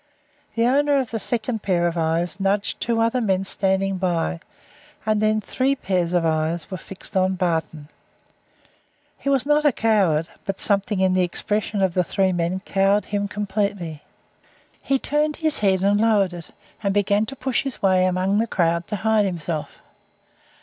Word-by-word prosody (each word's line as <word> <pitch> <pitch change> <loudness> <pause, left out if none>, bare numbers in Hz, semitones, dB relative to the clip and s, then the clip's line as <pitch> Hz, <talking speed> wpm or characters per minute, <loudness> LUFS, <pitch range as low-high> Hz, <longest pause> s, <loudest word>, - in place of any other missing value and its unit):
The 230 0 +2
owner 285 +3 +3
of 260 -4 -1
the 225 - -2
second 225 +1 -2
pair 175 -4 +1
of 170 0 0
eyes 165 +3 -1
nudged 195 +1 0
two 230 -1 0
other 230 +2 +1
men 190 -4 +1
standing 195 0 0
by, 165 - -1 0.7
and 215 -1 +1
then 215 0 +2
three 265 +5 0
pairs 185 -8 -1
of 175 -2 +1
eyes 160 +2 -1
were 185 - -3
fixed 190 +2 -9
on 190 0 +2
Barton. 160 -4 -2 1.3
He 275 - -2
was 270 -2 +2
not 295 +1 +3
a 295 - +5
coward, 195 -10 +2 0.2
but 195 -1 -4
something 200 -1 +2
in 190 -1 +3
the 185 - +2
expression 205 +3 -1
of 185 -2 +1
the 180 - +2
three 190 +2 +1
men 175 +2 -1
cowed 200 +1 +1
him 205 0 -2
completely. 200 -6 -3 0.8
He 275 - +1
turned 300 +3 0
his 315 -2 -1
head 190 -2 +2
and 205 +1 +3
lowered 205 -5 +3
it, 170 -3 -7 0.3
and 200 -1 -1
began 205 +1 +2
to 270 - -7
push 265 -1 -1
his 270 -6 -6
way 185 -1 +4
among 185 +3 +1
the 230 - +1
crowd 170 -3 0
to - - -3
hide 220 +1 +2
himself. 165 -3 -5
195 Hz, 175 wpm, -22 LUFS, 180-220 Hz, 1.3 s, a